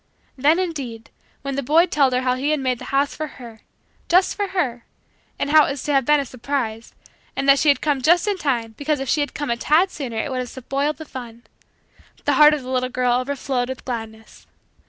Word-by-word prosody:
Then, 290 +5 +3
indeed, 275 -11 -4 0.3
when 275 -1 -3
the 280 - -1
boy 310 +6 +4
told 280 -7 +2
her 250 - +1
how 255 -1 +1
he 265 +3 -1
had 305 -1 +1
made 255 -2 -1
the - - -8
house 280 +1 0
for 310 - -4
her 235 -4 -11 0.5
just 365 +2 +4
for 405 -1 -2
her 270 -12 -2 0.5
and 285 - -2
how 310 0 +7
it - - -3
was 275 -1 -4
to 295 - -1
have 270 -2 +3
been 295 +2 +4
a 280 - -2
surprise; 240 -3 -4 0.4
and 275 - -2
that 275 0 +6
she 305 - +3
had 280 -3 +3
come 290 -3 0
just 345 +8 +3
in 405 -2 0
time 235 -7 -1
because 295 0 0
if 270 - -4
she 295 +3 +2
tad 290 - -7
come 295 +6 +2
sooner 255 -9 -6
it 220 - -2
would 255 - -2
have 250 -1 -4
spoiled 275 +4 -2
the 315 - -8
fun 240 -4 -9 0.8
the - - +3
heart 300 0 +7
of 285 - -7
the 255 - -6
little 255 0 0
girl 250 -1 +1
overflowed 255 -1 -2
with 260 - -7
gladness. 225 -3 -7
275 Hz, 225 wpm, -21 LUFS, 250-300 Hz, 0.8 s, how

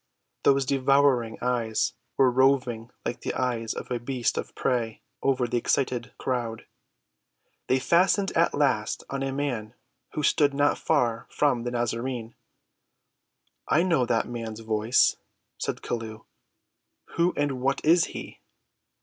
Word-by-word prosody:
Those 140 -1 +3
devouring 135 -3 +2
eyes 120 -3 0 0.2
were 130 -2 +5
roving 125 -3 +2 0.2
like 120 - -3
the - - -3
eyes 120 -3 -1
of - - -7
a 120 - 0
beast 120 0 -1
of - - -5
prey 115 -3 -1 0.2
over 130 -2 +2
the 120 - 0
excited 125 -3 0
crowd. 120 -3 -3 1.0
They 130 - +3
fastened 185 +8 +3
at 165 +1 +2
last 135 -7 +1
on 140 0 -2
a 135 0 -1
man 125 -5 -3 0.4
who 150 - -2
stood 145 -1 +3
not 145 +1 +2
far 120 -7 +1
from 125 -5 +1
the - - 0
Nazarene. 120 0 -3 1.3
"I 170 - +3
know 165 -9 +2
that 115 - +1
man's 115 -2 -6
voice," 110 +2 +2 0.4
said - - -3
Chelluh. 110 -2 -5 0.9
"Who 170 +1 +2
and 140 -3 -1
what 135 +1 +1
is 165 +2 +5
he?" - - -9
125 Hz, 135 wpm, -26 LUFS, 115-140 Hz, 1.3 s, were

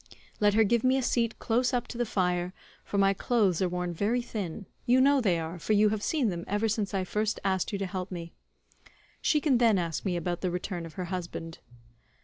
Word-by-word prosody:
Let 205 -1 +3
her 220 - +6
give 230 +2 +2
me 260 +1 +4
a 265 - 0
seat 230 -2 0
close 245 +2 +1
up 245 0 -1
to 235 - -6
the 240 - 0
fire, 180 -2 0 0.3
for 200 - -3
my 195 0 +4
clothes 195 -4 +1
are 185 - +2
worn 180 0 -2
very 220 +8 0
thin—you 215 +4 -2
know 275 +1 +5
they 185 -7 +2
are, 165 +2 -5
for 165 +7 0
you 210 0 +5
have 215 -1 -2
seen 270 -2 +1
them 170 -2 -4
ever 210 +3 0
since 215 -2 -1
I 190 - +1
first 210 +3 -1
asked 190 -2 0
you 200 - -1
to 195 - -2
help 185 0 -4
me—she 175 - -5
can 270 -6 +3
then 230 -4 +4
ask 170 -3 -2
me 180 -3 -1
about 175 +1 -3
the 185 - 0
return 180 -1 -4
of 160 - -13
her 185 - -4
husband." 170 -2 -5
200 Hz, 220 wpm, -29 LUFS, 180-230 Hz, 0.3 s, her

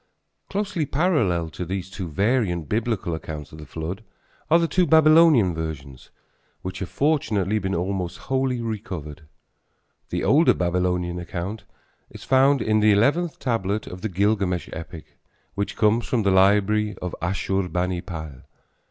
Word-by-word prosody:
Closely 195 -6 -2
parallel 130 - +1
to 90 - -5
these 95 +1 -4
two 95 -1 -6
variant 95 - 0
Biblical 105 -6 -1
accounts 75 -2 -6
of 80 - -11
the 75 - -10
flood 85 +8 -5 0.5
are 165 - +6
the 170 -1 +1
two 175 +3 +2
Babylonian 155 - +6
versions, 75 -5 -7 0.5
which 95 0 -5
have 95 - -5
fortunately 110 - +1
been 95 -1 -2
almost 90 0 -2
wholly 130 -2 -1
recovered. 90 -10 -6 0.8
The - - -2
older 155 +5 +4
Babylonian 90 0 -1
account 95 +4 -5 0.4
is - - -12
found 135 0 +3
in 110 0 +2
the 105 0 +5
eleventh 145 +11 +2
tablet 110 -4 -1
of 90 0 -9
the 110 - -2
Gilgamesh 95 -2 0
epic, 80 0 -10 0.3
which 100 0 -3
comes 110 +2 +2
from 120 -4 0
the 100 - +3
library 105 +2 +3
of 90 - -5
Asshurbanipal. 90 -5 -2
95 Hz, 140 wpm, -23 LUFS, 85-115 Hz, 0.8 s, are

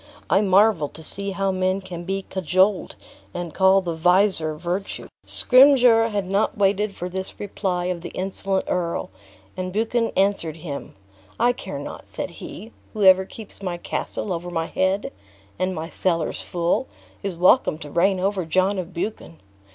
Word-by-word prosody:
I 195 - +5
marvel 195 -5 +4
to 160 - -11
see 200 +5 -4
how 195 0 0
men 185 +1 0
can 175 -3 -8
be 195 +1 -2
cajoled 190 +2 +1 0.4
and 175 -2 -4
call 190 0 +5
the 175 -2 -3
visor 175 -1 +2
virtue." 175 +5 -4 0.2
Scrymgeour 250 -3 +6
had 205 -4 -2
not 195 +3 0
waited 200 0 +1
for 180 - -4
this 190 +1 -6
reply 190 -3 -2
of 180 -1 -2
the 175 - -6
insolent 190 +1 0
earl, 170 - -2 0.4
and 185 0 -4
Buchan 225 +3 0
answered 190 -5 +1
him: 150 -4 -7 0.4
"I 240 +2 +4
care 245 - -7
not," - - -8
said - - -5
he; 225 - -9 0.2
"whoever 190 -3 +5
keeps 210 0 -9
my 180 -3 -3
castle 185 +2 -3
over 175 +1 -5
my 165 -2 -1
head, 190 +4 0 0.5
and 185 0 0
my 160 +1 -4
cellars 170 -2 -1
full, 170 0 -1 0.3
is 195 -3 -3
welcome 180 +1 +4
to 150 -2 -9
reign 185 +4 +2
over 195 0 0
John 185 +4 +1
of 180 0 -7
Buchan. 170 -2 -5
190 Hz, 160 wpm, -23 LUFS, 175-200 Hz, 0.5 s, Scrymgeour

